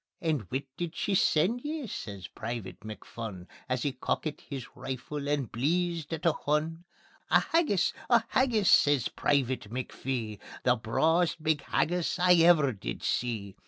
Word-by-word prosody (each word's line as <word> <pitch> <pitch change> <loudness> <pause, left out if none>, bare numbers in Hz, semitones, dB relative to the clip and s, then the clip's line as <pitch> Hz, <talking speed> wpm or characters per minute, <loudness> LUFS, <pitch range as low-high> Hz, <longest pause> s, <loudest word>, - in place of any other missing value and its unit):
"And 150 - -1
whit 135 +2 -2
did 175 -1 -4
she 205 - -1
send 190 +6 +3
ye?" 300 0 -4
says 100 - -6
Private 115 +1 -6
McPhun, 110 -2 -7 0.2
As 130 -1 0
he 145 - +1
cockit 145 +3 -3
his 135 -4 -8
rifle 135 +2 -5
and 145 -4 -1
bleezed 165 +5 0
at 165 +1 -4
a 165 - +5
Hun. 160 +3 -1 0.4
"A - - +6
haggis! 310 - +2 0.2
A 235 -2 +5
HAGGIS!" 230 -7 +2
says 145 -4 +5
Private 130 -6 0
McPhee; 120 -3 -4 0.2
"The - - +4
brawest 160 +9 +1
big 155 -2 +2
haggis 175 +1 0
I 180 0 +5
ever 165 -5 +6
did 95 - -6
see. 110 -5 -2
145 Hz, 150 wpm, -29 LUFS, 120-175 Hz, 0.4 s, A